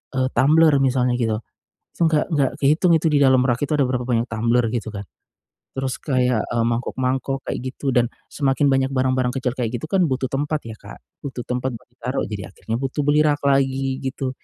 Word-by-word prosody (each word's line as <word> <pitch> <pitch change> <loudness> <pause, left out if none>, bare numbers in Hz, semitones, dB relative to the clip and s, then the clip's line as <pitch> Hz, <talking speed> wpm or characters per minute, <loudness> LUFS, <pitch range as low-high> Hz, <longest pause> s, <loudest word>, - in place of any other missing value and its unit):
eee, 130 -1 +2
tumbler 155 +2 +5
misalnya 125 -1 +2
gitu. 110 -3 0 0.6
Itu - - -10
nggak 155 -2 +2
nggak 140 -3 +2
kehitung 155 +6 +3
itu 160 - 0
di 145 - +3
dalam 130 -1 +5
rak 120 -2 +1
itu 145 - -10
ada 140 - +3
berapa 125 -1 -1
banyak 120 -1 +1
tumbler 115 +2 +1
gitu, 115 -2 -3
kan. 100 -1 -6 0.7
Terus 135 -1 -2
kayak, 125 -5 +1
eee, 115 -1 0
mangkuk-mangkuk 130 +3 -1
kayak - - -2 0.2
gitu 140 - -2
dan 120 -1 +4 0.3
semakin 140 0 +1
banyak 135 0 +2
barang-barang 130 -1 +1
kecil 130 -2 -1
kayak 120 -2 -1
gitu 120 - -6
kan 190 -2 +3
butuh 130 -1 -1
tempat 145 +2 -1
ya, 110 -1 -7
Kak. - - -12 0.3
Butuh 130 -3 -5
tempat 125 +1 -2
buat 115 - -18
ditaruh. 125 +2 -3
Jadi 100 -2 -4
akhirnya 110 +3 -5
butuh 135 +2 -2
beli 150 +1 +4
rak 145 -1 +1
lagi, 135 -1 +1
gitu. 130 0 -3
130 Hz, 200 wpm, -22 LUFS, 125-140 Hz, 0.7 s, tumbler